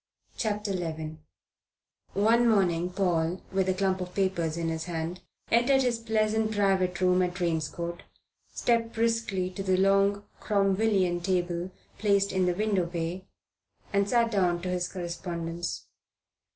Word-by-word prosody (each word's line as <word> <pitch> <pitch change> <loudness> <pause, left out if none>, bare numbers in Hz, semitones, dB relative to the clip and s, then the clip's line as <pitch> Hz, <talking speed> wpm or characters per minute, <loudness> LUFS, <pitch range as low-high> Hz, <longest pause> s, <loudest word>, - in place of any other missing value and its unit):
CHAPTER 210 -2 -1
XI 160 -3 -4 1.0
ONE 230 +4 +4
morning 180 -5 +2
Paul, 180 -2 0
with 190 -1 +1
a - - +3
clump 190 -1 0
of 180 0 -6
papers 175 -5 0
in 165 -1 -1
his 160 0 -3
hand, 170 +1 -4 0.3
entered 265 +3 +4
his 240 -2 0
pleasant 220 -1 +1
private 190 -3 +1
room 180 0 +4
at 180 -1 -1
Drane's 165 -4 0
Court, 170 +1 -5 0.5
stepped 230 -1 0
briskly 225 -5 0
to 190 - -6
the 190 -1 +1
long 195 +1 +3 0.2
Cromwellian 195 -3 +1
table 175 -1 -1 0.3
placed 200 -2 +2
in 185 -1 +1
the 180 - +1
window 200 -3 +1
bay, 170 +2 -4 0.7
and 200 0 +2
sat 235 0 +3
down 180 -4 +2
to 185 - -2
his 180 -1 -1
correspondence. 170 -1 -4
185 Hz, 140 wpm, -28 LUFS, 175-205 Hz, 1.0 s, ONE